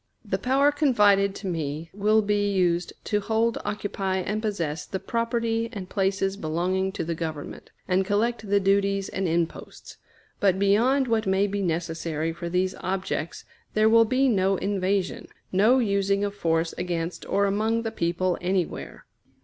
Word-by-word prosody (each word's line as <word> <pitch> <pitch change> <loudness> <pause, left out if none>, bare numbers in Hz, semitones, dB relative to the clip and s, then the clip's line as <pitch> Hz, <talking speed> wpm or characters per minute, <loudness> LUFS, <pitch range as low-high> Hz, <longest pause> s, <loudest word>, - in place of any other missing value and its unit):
The 195 -2 -1
power 270 +6 +3
confided 205 -9 +3
to 195 - -6
me 160 -1 -4
will 215 +2 +3
be 205 0 +1
used 180 -2 +1
to 210 - 0
hold, 225 +2 0
occupy, 200 -2 -2
and 210 +3 -2
possess 170 -8 -2
the 190 - -5
property 230 0 -1
and 195 -6 -7
places 195 0 0
belonging 185 +3 -1
to - - -3
the 165 +1 -2
Government, 160 -3 -6 0.2
and 185 +1 +2
collect 215 +2 -1
the 200 0 +4
duties 195 0 +1
and 190 -1 -2
imposts; 165 0 -3 0.4
but 190 -2 +3
beyond 235 +8 +3
what 225 -3 0
may 190 +1 +3
be 200 0 -2
necessary 165 -2 -2
for 170 +1 -6
these 185 +2 0
objects 185 -4 -3 0.3
there 215 0 +4
will 230 0 +6
be 260 +4 +2
no 195 -4 +2
invasion, 195 -1 -1 0.2
no 215 +7 +4
using 200 -3 +1
of 200 0 -1
force 165 -4 0
against 175 -1 -3
or 200 0 +2
among 220 +3 0
the 225 - -3
people 175 +1 -1
anywhere. 180 -1 -2
195 Hz, 155 wpm, -25 LUFS, 180-215 Hz, 0.4 s, will